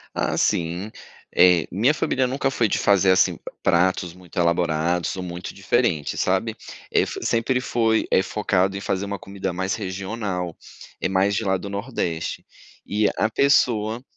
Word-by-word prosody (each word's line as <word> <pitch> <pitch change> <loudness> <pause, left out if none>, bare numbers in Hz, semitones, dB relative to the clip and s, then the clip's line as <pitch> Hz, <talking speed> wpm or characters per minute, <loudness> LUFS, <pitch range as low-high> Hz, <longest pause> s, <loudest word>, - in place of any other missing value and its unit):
Ah, - - 0
sim. 85 +5 0 0.4
Eh, 90 -2 +5
minha 115 - +3
família 135 -4 0
nunca 135 +1 -1
foi 120 -4 +1
de - - 0
fazer, 100 -2 +4
assim, 95 0 +4
p - - -23 0.2
pratos 90 0 +2
muito 90 -1 -11
elaborados 85 0 +1
ou 95 - -4
muito 90 0 -6
diferentes, 100 - 0
sabe? - - 0 0.3
Eh, - - +3
f - - -4
sempre 120 +3 +1
foi, 115 -3 +1
eh, 95 - +4
focado 95 -2 0
em - - -4
fazer 100 0 -2
uma 100 0 -4
comida 95 0 -5
mais 95 +1 -2
regional, 95 -3 -4 0.4
eh, - - 0
mais 95 +2 +2
de 110 - -1
lá 95 -1 +2
do 100 - -7
nordeste. 100 -6 -3 0.4
E 105 +1 +1
a 110 - +3
pessoa 115 -4 +2
95 Hz, 165 wpm, -23 LUFS, 90-110 Hz, 0.4 s, Eh